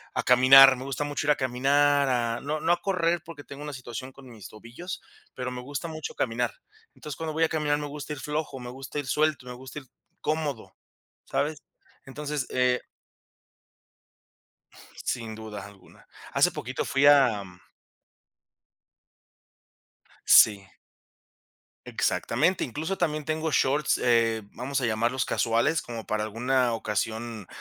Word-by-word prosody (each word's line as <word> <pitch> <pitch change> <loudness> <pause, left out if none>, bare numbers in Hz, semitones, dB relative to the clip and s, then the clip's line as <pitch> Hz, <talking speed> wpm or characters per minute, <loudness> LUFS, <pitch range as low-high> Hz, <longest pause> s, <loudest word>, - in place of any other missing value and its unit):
a - - 0
caminar. 130 +2 +8
Me 130 - -8
gusta 140 +1 -3
mucho 145 0 -3
ir - - +5
a - - +4
caminar, 140 +2 +2
a 120 -2 0
no 150 +2 -3
no 170 - +2
a 175 - +2
correr 175 -3 0
porque 165 -3 -10
tengo 140 +1 -10
una 150 -1 -6
situación 130 0 -7
con 135 -1 -15
mis 110 -6 -11
tobillos, 120 - -9 0.3
pero 125 0 -4
me 125 0 -6
gusta 140 +5 -5
mucho 155 -1 -6
caminar. 120 -1 -1 0.4
Entonces, 150 - -8
cuando 160 -1 -4
voy 160 +1 +1
a 160 - +3
caminar, 150 -2 0
me 150 - -4
gusta 150 +1 -6
ir 145 - -8
flojo, 150 0 -4
me 125 -1 -7
gusta 135 +3 -8
ir 140 - -5
suelto, 150 0 +1
me 125 - -7
gusta 130 +4 -9
ir 135 - -16 0.4
cómodo, 150 -6 -3 0.5
¿sabes? 150 0 -2 0.4
Entonces 145 0 -4
eh, 125 -1 +1 2.2
Sin 115 -2 -3
duda 110 -2 -8
alguna. 100 -1 -17 0.3
Hace - - +4
poquito - - -4
fui 140 +1 +2
a 130 -8 +5 2.8
Sí. 100 -2 +6 1.2
Exactamente. 185 - 0
Incluso 160 +9 -4
también 155 -3 -1
tengo 155 +1 -2
shorts, 145 +2 +2
eh, 115 -2 +2
vamos 135 +3 -3
a 125 - 0
llamarlos 115 +3 0
casuales, 120 +7 +1
como 115 -2 -8
para 105 0 -1
alguna 120 +3 0
ocasión, 110 0 -3
135 Hz, 145 wpm, -27 LUFS, 120-150 Hz, 2.8 s, caminar